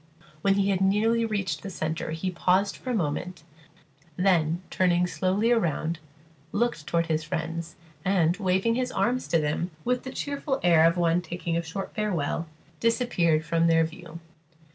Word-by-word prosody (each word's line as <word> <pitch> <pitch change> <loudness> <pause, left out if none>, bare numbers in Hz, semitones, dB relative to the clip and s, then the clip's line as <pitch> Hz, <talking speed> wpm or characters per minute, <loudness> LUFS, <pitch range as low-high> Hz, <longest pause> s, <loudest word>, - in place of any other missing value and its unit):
When 195 +2 +3
he 200 0 +2
had 190 -1 0
nearly 220 +4 +3
reached 195 -8 -2
the 195 - -6
centre 160 -3 -3
he 160 +4 -2
paused 185 +3 +2
for 255 - -8
a - - +1
moment, 175 -1 -2 0.7
then, 175 -2 +2
turning 180 -1 +2
slowly 190 +5 +1
round, 170 -6 0 0.5
looked 205 -9 -1
toward 170 0 +1
his 160 -1 -1
friends, 165 +1 -4 0.3
and 180 -3 +2
waving 190 +2 +1
his 255 +1 -1
arms 250 +2 0
to 165 - +2
them 155 +3 -1 0.2
with 250 +1 +1
the 260 - -7
cheerful 280 -1 -2
air 165 -2 +6
of 165 +2 +1
one 170 0 +2
taking 175 0 -4
a 170 - +1
short 180 +4 -6
farewell, 170 -6 -1 0.3
disappeared 180 -10 +2
from 165 +1 +2
their 165 0 +4
view. 165 0 -7
180 Hz, 165 wpm, -27 LUFS, 165-200 Hz, 0.7 s, air